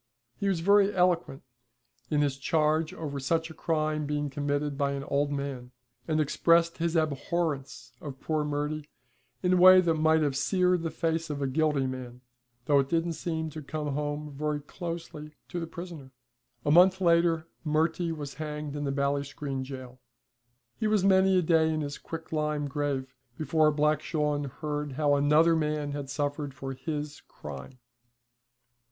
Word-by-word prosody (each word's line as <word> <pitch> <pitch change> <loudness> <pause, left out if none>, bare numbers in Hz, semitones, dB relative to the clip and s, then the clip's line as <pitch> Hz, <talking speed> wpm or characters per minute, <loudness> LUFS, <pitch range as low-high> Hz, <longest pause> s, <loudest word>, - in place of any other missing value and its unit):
He 200 - -1
was 185 -4 +1
very 200 +2 +5
eloquent 180 -6 +1 0.7
in 150 -1 +2
his 140 -2 0
charge 155 +2 +1
over 145 -3 -5
such 160 +4 -1
a - - -9
crime 155 -2 -1
being 145 -1 -2
committed 145 +1 -1
by 140 0 0
an 140 0 -4
old 145 +1 0
man, 140 -3 -4 0.4
and 155 -1 +1
expressed 165 +3 +3
his 170 0 0
abhorrence 155 -1 -2
of 135 -3 -7
poor 155 -1 -1
Murty 150 +1 -3 0.5
in 180 0 +3
a - - +4
way 185 +1 +9
that 170 -3 +2
might 160 0 +3
have 140 -2 0
seared 180 +4 +2
the 165 - -2
face 165 0 -1
of 145 -1 -3
a 140 - -1
guilty 145 0 +1
man, 125 -1 -6 0.4
though 145 +1 +4
it 135 0 0
didn't 165 0 0
seem 160 0 -3
to 155 - -7
come 150 0 -4
home 150 +1 -3
very 150 +1 -1
closely 155 -1 -7
to 175 - -3
the 165 - -4
prisoner. 170 -6 -8 0.6
A 145 - +2
month 185 +3 +6
later 170 -2 +3 0.2
Murty 160 +2 +1
was 145 -3 -5
hanged 150 -2 -5
in 145 0 -3
Ballinscreen 140 0 -2
jail. 130 -1 -9 0.8
He 220 - +1
was 215 -3 +2
many 190 -1 +5
a 180 - +3
day 160 -1 +3
in 155 0 -1
his 145 -1 -5
quicklime 150 -2 -3
grave 140 -2 -2 0.2
before 155 0 +3
Black 150 0 +2
Shawn 150 -2 -1
heard 150 +1 -4
how 145 +1 +2
another 150 +4 +4
man 150 -2 -1
had 140 -1 -5
suffered 145 -1 -3
for 135 0 -5
his 150 +1 -5
crime. 70 - -9
150 Hz, 165 wpm, -28 LUFS, 145-165 Hz, 0.8 s, way